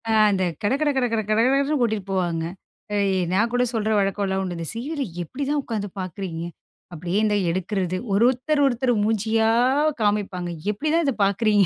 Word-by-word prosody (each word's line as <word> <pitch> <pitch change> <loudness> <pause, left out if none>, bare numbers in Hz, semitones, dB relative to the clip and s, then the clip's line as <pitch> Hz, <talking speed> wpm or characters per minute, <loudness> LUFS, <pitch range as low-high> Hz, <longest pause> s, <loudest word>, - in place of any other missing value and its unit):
ஆ, - - +2 0.2
அந்த 190 -1 +1 0.2
கட 205 - +2
கட 305 - +3
கட 265 -2 +2
கட 225 - +2
கடகடன்னு 270 +7 +3
கூட்டிட்டு 220 -5 0
போவாங்க. 175 -3 0 0.5
அ - - +1 0.4
நான் 225 +5 +2
கூட 245 0 +2
சொல்ற 220 -1 0
வழக்கம்லாம் 195 -1 0
உண்டு. 180 -2 -4
இந்த 165 - -4
சீரியல 280 +6 -3 0.2
எப்டிதான் 285 - -2
உட்காந்து 210 -4 -3
பார்க்குறீங்க. 185 -2 -5 0.5
அப்படியே 175 +3 -2
இந்த 210 -1 +2
எடுக்கிறது. 185 +1 -1 0.2
ஒரு 200 +3 +4
ஒருத்தர் 285 +4 +1
ஒருத்தர் 250 -1 +1
மூஞ்சியா 220 +1 +1 0.5
காமிப்பாங்க. 205 -4 0 0.2
எப்படிதான் 310 +10 0
இத 275 - +1
பார்க்குறீங்க? 205 0 +3
215 Hz, 160 wpm, -23 LUFS, 190-250 Hz, 0.5 s, ஒரு